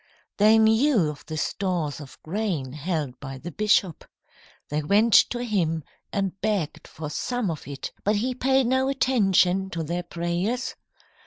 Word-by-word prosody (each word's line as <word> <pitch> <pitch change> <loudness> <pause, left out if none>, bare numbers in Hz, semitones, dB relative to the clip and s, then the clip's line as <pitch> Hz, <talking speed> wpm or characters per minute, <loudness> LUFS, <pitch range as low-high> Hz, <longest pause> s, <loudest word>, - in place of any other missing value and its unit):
"They 215 +2 +6
knew 220 - +4
of 145 - -12
the 155 0 -4
stores 170 -3 -2
of 140 - -12
grain 165 -8 -2
held 150 -4 -3
by 135 -1 -7
the 175 +6 -7
bishop. 205 -4 +1 0.7
They 150 +1 -1
went 205 +8 +3 0.2
to 240 0 -3
him 170 -9 0 0.3
and 195 -1 -2
begged 200 -8 -2
for 155 -1 -7
some 245 +1 -1
of 155 - -7
it, 140 -1 -6
but 210 +2 +2
he 245 +5 0
paid 265 +1 +2
no 260 +2 +2
attention 195 -8 +2
to 165 -3 -3
their 170 +3 -2
prayers. 175 +8 -2
190 Hz, 155 wpm, -25 LUFS, 155-220 Hz, 0.7 s, They